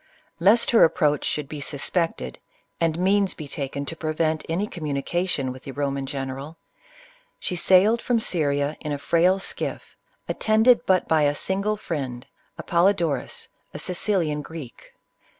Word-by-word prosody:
Lest 205 Hz, +7 st, +4 dB
her 230 Hz, -, +7 dB
approach 150 Hz, -2 st, +3 dB
should 150 Hz, -2 st, -2 dB
be 150 Hz, 0 st, -7 dB
suspected, 140 Hz, -, -2 dB, 0.4 s
and 165 Hz, -1 st, +1 dB
means 195 Hz, +2 st, +2 dB
be 155 Hz, -, -7 dB
taken 140 Hz, -1 st, -4 dB
to 165 Hz, -, -4 dB
prevei^ 155 Hz, 0 st, -1 dB
any 175 Hz, +5 st, 0 dB
communication 155 Hz, -3 st, -2 dB
with 130 Hz, 0 st, -9 dB
the 135 Hz, -, -8 dB
Ro 140 Hz, 0 st, -1 dB
man 135 Hz, -1 st, -4 dB
general, 135 Hz, +3 st, -5 dB, 0.8 s
she 180 Hz, -, -2 dB
sailed 190 Hz, +6 st, +4 dB
from 245 Hz, -2 st, +1 dB
Syria 145 Hz, -6 st, 0 dB
in 150 Hz, -, -5 dB
a 145 Hz, -, -1 dB
frail 170 Hz, +6 st, +3 dB
skiff, 195 Hz, -, -5 dB, 0.3 s
at -, -, -4 dB
tended 220 Hz, +3 st, +4 dB
but 185 Hz, -1 st, +3 dB
by 160 Hz, -1 st, +3 dB
a 145 Hz, 0 st, +2 dB
single 200 Hz, +6 st, 0 dB
friend, 135 Hz, -10 st, -4 dB, 0.3 s
Apollodorus, 170 Hz, -5 st, 0 dB, 0.3 s
a -, -, -3 dB
Sicilian 175 Hz, -5 st, 0 dB
Greek. 150 Hz, -6 st, -10 dB
160 Hz, 150 wpm, -24 LUFS, 140-185 Hz, 0.8 s, her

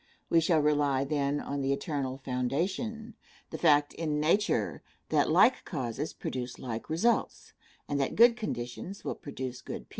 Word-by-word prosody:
We 165 Hz, -, +6 dB
shall 165 Hz, 0 st, +3 dB
rely, 145 Hz, -2 st, +2 dB
then, 140 Hz, 0 st, 0 dB
on 140 Hz, 0 st, -3 dB
the 135 Hz, 0 st, 0 dB
eternal 140 Hz, -2 st, -2 dB
foundation 175 Hz, -, -2 dB, 0.4 s
the -, -, -5 dB
fact 145 Hz, -3 st, +4 dB
in 155 Hz, -2 st, -2 dB
nature 185 Hz, +7 st, +1 dB, 0.3 s
that -, -, +2 dB
like -, -, +5 dB
causes 140 Hz, -1 st, -3 dB
produce 125 Hz, -1 st, -5 dB
like 115 Hz, -3 st, -6 dB
results, 205 Hz, +10 st, 0 dB, 0.3 s
and 145 Hz, -, -1 dB
that 135 Hz, -, -1 dB
good 235 Hz, +1 st, +7 dB
conditions 190 Hz, -, -5 dB
will -, -, -1 dB
produce 130 Hz, -3 st, -6 dB
good -, -, -6 dB
people. -, -, -23 dB
145 Hz, 155 wpm, -30 LUFS, 130-170 Hz, 0.4 s, good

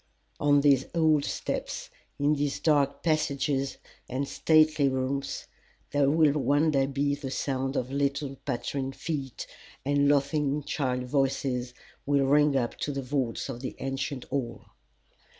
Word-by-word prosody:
On 145 Hz, -1 st, +4 dB
these 140 Hz, -2 st, +4 dB
old 155 Hz, -3 st, +3 dB
steps, -, -, -4 dB, 0.3 s
in 145 Hz, +1 st, +2 dB
these 145 Hz, -1 st, -1 dB
dark 140 Hz, -3 st, +2 dB
passages 140 Hz, -3 st, 0 dB, 0.3 s
and 135 Hz, +2 st, -2 dB
stately 155 Hz, -2 st, +3 dB
rooms, 130 Hz, +1 st, -2 dB, 0.5 s
there 145 Hz, -1 st, +3 dB
will 155 Hz, -1 st, +4 dB
one 145 Hz, +4 st, +3 dB
day 135 Hz, -2 st, +2 dB
be 140 Hz, +1 st, 0 dB
the 140 Hz, -1 st, -5 dB
sound 135 Hz, 0 st, -2 dB
of 125 Hz, 0 st, -2 dB
little 140 Hz, 0 st, -1 dB
pattering 135 Hz, +1 st, -3 dB
feet, 140 Hz, -5 st, -4 dB, 0.4 s
and 145 Hz, 0 st, +3 dB
laughing 145 Hz, 0 st, +1 dB
child 130 Hz, -3 st, -1 dB
voices 125 Hz, -2 st, -1 dB, 0.3 s
will 140 Hz, -1 st, +3 dB
ring 145 Hz, +1 st, +4 dB
up 120 Hz, -3 st, 0 dB
to 145 Hz, -, -2 dB
the 135 Hz, -1 st, -3 dB
vaults 130 Hz, -3 st, -2 dB
of 130 Hz, -3 st, -6 dB
the 130 Hz, -, -5 dB
ancient 135 Hz, -1 st, -3 dB
hall. 120 Hz, -4 st, -4 dB
140 Hz, 140 wpm, -28 LUFS, 135-145 Hz, 0.5 s, On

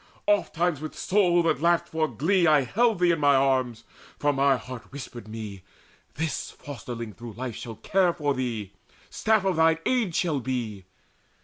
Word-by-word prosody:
Ofttimes 175 Hz, -6 st, +1 dB
with 155 Hz, -, -7 dB
soul 180 Hz, -3 st, +3 dB
that 160 Hz, -3 st, +1 dB
laughed 170 Hz, 0 st, +3 dB
for 160 Hz, -1 st, 0 dB
glee 170 Hz, -, +2 dB
I 150 Hz, -2 st, +5 dB
held 225 Hz, -, +2 dB
Thee 175 Hz, 0 st, +3 dB
in 165 Hz, -, 0 dB
mine 145 Hz, -1 st, +5 dB
arms; 130 Hz, -4 st, +1 dB, 0.3 s
for 145 Hz, 0 st, +1 dB
mine 135 Hz, -1 st, +3 dB
heart 125 Hz, 0 st, -9 dB
whispered 125 Hz, -5 st, -8 dB
me 110 Hz, -3 st, -7 dB, 0.5 s
`This 160 Hz, +1 st, -3 dB
fosterling 120 Hz, -5 st, -7 dB
through 120 Hz, 0 st, -9 dB
life 120 Hz, 0 st, -5 dB
shall 115 Hz, -1 st, -7 dB
care 185 Hz, -, +2 dB
for 150 Hz, -4 st, -1 dB
thee, 115 Hz, -6 st, -3 dB, 0.4 s
Staff 220 Hz, -3 st, +2 dB
of 190 Hz, -3 st, +1 dB
thine 160 Hz, 0 st, +4 dB
age 230 Hz, -10 st, +1 dB
shall 160 Hz, -5 st, +1 dB
be.' 115 Hz, -6 st, -4 dB
145 Hz, 170 wpm, -26 LUFS, 120-170 Hz, 0.5 s, I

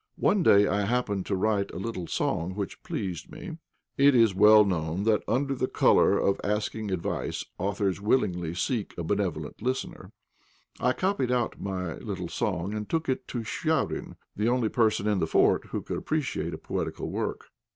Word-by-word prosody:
One 205 Hz, -, +3 dB
day 100 Hz, -11 st, +6 dB
I 100 Hz, 0 st, +1 dB
happened 105 Hz, -4 st, -1 dB
to 100 Hz, -, 0 dB
write 100 Hz, +1 st, +1 dB
a -, -, -8 dB
little 95 Hz, -3 st, -4 dB
song 90 Hz, +3 st, -1 dB
which 100 Hz, -3 st, -5 dB
pleased 90 Hz, -4 st, -4 dB
me. 165 Hz, -, -8 dB, 0.4 s
It 140 Hz, 0 st, +6 dB
is 115 Hz, -4 st, +5 dB
well 105 Hz, +2 st, +7 dB
known 85 Hz, -1 st, -1 dB
that 110 Hz, -1 st, +3 dB
under 135 Hz, +3 st, 0 dB
colour -, -, +4 dB
of 100 Hz, -, +1 dB
asking 105 Hz, +1 st, -2 dB
advice, 95 Hz, -3 st, -3 dB
authors 100 Hz, 0 st, -1 dB
willingly 90 Hz, -7 st, 0 dB
seek 105 Hz, +4 st, -2 dB
a 85 Hz, -, -3 dB
benevolent 85 Hz, -5 st, -2 dB
listener; 130 Hz, +3 st, -3 dB, 0.7 s
I 125 Hz, -, +2 dB
copied 185 Hz, -9 st, 0 dB
out 125 Hz, -2 st, -1 dB
my 90 Hz, -5 st, -3 dB
little -, -, -5 dB
song, 95 Hz, +5 st, -2 dB
and 105 Hz, -1 st, -4 dB
took 165 Hz, -3 st, -1 dB
it 130 Hz, -, -1 dB
to 120 Hz, -3 st, -4 dB
Chvabrine, 160 Hz, +7 st, -1 dB, 0.2 s
the 105 Hz, +3 st, +1 dB
only 120 Hz, -3 st, +1 dB
person 110 Hz, -3 st, +2 dB
in 105 Hz, -2 st, +2 dB
the -, -, 0 dB
fort -, -, +3 dB
who -, -, -4 dB
could -, -, -4 dB
appreciate 155 Hz, -3 st, -2 dB
a -, -, -8 dB
poetical -, -, -4 dB
work. -, -, -3 dB
105 Hz, 170 wpm, -27 LUFS, 95-125 Hz, 0.7 s, well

